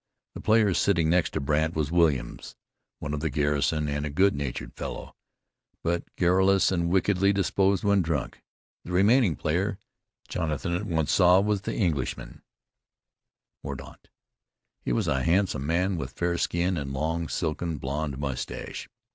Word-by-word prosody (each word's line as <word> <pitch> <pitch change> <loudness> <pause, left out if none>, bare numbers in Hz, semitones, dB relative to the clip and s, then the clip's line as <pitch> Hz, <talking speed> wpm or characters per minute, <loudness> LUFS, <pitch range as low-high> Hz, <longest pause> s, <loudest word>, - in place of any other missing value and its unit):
The - - -8
player 110 -3 +3
sitting 85 -4 +2
next 85 -2 +2
to - - -1
Brandt 75 +3 0
was 75 -1 -1
Williams, 80 -7 0 0.4
one 75 -1 -5
of 75 - -2
the 80 +1 -1
garrison, 75 +2 0
and 75 0 -2
a 75 - -2
good 95 +7 +3
natured 70 -3 -4
fellow, - - -7 0.7
but 85 +1 0
garrulous 95 +2 +3
and 85 -2 0
wickedly 95 +1 +2
disposed 95 0 +1
when 100 -2 +3
drunk. 80 -6 -3 0.4
The 90 - -7
remaining 100 - +4
player 95 +6 -1 0.5
Jonathan 85 +2 -2
at 95 +4 -2
once 80 -5 0
saw 90 0 +6
was 105 0 0
the - - -4
Englishman, 80 - -2 1.2
Mordaunt. 70 -1 -9 0.7
He - - -3
was - - 0
a 65 - +1
handsome 85 -4 +1
man, 90 +3 +1
with 65 -5 -5
fair 85 0 -1
skin, 90 +1 0
and 70 -3 -4
long, 80 +4 -2
silken, 80 0 -2
blond 70 +1 -3
mustache. 70 -3 -5
85 Hz, 150 wpm, -27 LUFS, 75-95 Hz, 1.2 s, saw